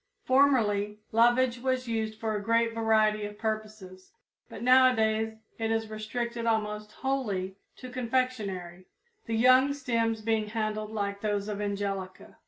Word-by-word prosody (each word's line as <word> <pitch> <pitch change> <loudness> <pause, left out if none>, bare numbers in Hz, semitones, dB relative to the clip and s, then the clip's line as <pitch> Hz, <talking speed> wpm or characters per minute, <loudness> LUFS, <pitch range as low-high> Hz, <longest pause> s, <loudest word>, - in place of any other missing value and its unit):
Formerly 220 -7 +2
lovage 240 +2 +3
was 255 0 -1
used 220 -1 -2
for 220 -1 -2
a 205 - -2
great 230 +2 +1
variety 220 -2 +2
of 205 0 -8
purposes, 215 -4 -5 0.4
but - - -8
nowadays 225 -4 +4 0.2
it 225 0 -1
is 225 -1 -1
restricted 235 +2 -4
almost 210 -1 -1
wholly 210 -9 -2 0.2
to 255 - -10
confectionery, 225 -8 -2 0.4
the 225 - -1
young 255 +4 +5
stems 230 -5 -1
being 220 -1 0
handled 215 -1 -3
like 200 -2 -3
those 205 -1 -1
of 210 -1 -4
Angelica. 200 -2 -4
220 Hz, 135 wpm, -28 LUFS, 210-235 Hz, 0.4 s, young